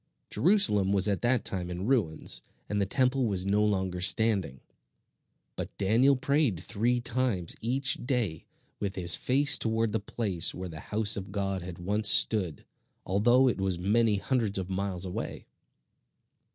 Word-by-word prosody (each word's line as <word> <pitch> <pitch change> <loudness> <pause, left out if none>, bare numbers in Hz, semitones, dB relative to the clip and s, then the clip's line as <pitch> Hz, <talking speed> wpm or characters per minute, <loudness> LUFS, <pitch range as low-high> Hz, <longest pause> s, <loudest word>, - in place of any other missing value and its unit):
Jerusalem 140 - +2
was 100 0 +2
at 100 -2 -1
that 120 -1 +1
time 90 -2 -2
in 90 +2 -5
ruins, 105 - -1 0.3
and 105 -1 -2
the 100 - 0
Temple 130 +2 +1
was 95 -3 -1
no 100 +2 +1
longer 95 -3 -1
standing; 95 - +2 0.9
but - - -7
Daniel 115 +8 +3
prayed 140 - 0
three 115 +8 -1
times 120 -7 -2
each 130 +4 0
day 120 - -1 0.3
with 100 -2 -4
his 85 -2 +5
face 140 +4 +3
toward 110 -1 -1
the 110 - -1
place 100 -4 -2
where 90 0 -6
the 80 -2 -9
house 105 0 +4
of 95 -1 -7
God 95 -2 -3
had 90 -1 -8
once 100 +4 0
stood, 95 -8 +2 0.4
although 120 +7 +3
it 110 -6 -1
was 95 -2 -1
many 105 +4 +1
hundreds 105 0 -1
of 95 0 -5
miles 95 -1 -3
away. 90 - -6
100 Hz, 155 wpm, -28 LUFS, 95-120 Hz, 0.9 s, his